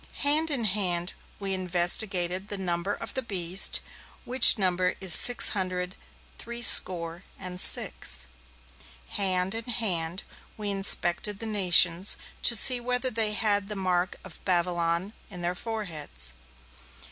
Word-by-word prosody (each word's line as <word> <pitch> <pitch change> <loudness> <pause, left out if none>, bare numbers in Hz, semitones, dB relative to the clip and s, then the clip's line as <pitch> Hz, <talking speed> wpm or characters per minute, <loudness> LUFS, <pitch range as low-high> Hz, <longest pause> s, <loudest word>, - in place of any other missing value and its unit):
Hand 305 +3 +3
in 275 -6 -3
hand 185 -4 -2 0.3
we 195 -1 -5
investigated 185 +1 -1
the 205 - -5
number 180 0 -4
of - - -10
the 265 - -4
Beast, 190 -5 0 0.4
which 250 -1 +8
number 185 -2 -2
is 190 -3 +3
six 245 -1 +5
hundred 185 -1 -5 0.4
three 235 +1 -8
score 170 -4 +4
and 180 0 -6
six. 65 -1 +1 0.8
Hand 185 -1 -2
in 225 0 -8
hand 185 -7 -3 0.3
we 210 -1 -4
inspected 195 0 0
the 225 - -9
nations, 185 -3 +3 0.2
to 235 - +2
see 250 +3 +6
whether 250 +1 -3
they 220 -2 +1
had 205 -1 -1
the 210 - -5
mark 185 -2 -3
of 190 -4 -12
Babylon 175 +1 -2 0.2
in 180 -3 -10
their 175 +1 -3
foreheads. 180 - -7
190 Hz, 135 wpm, -25 LUFS, 175-215 Hz, 0.8 s, which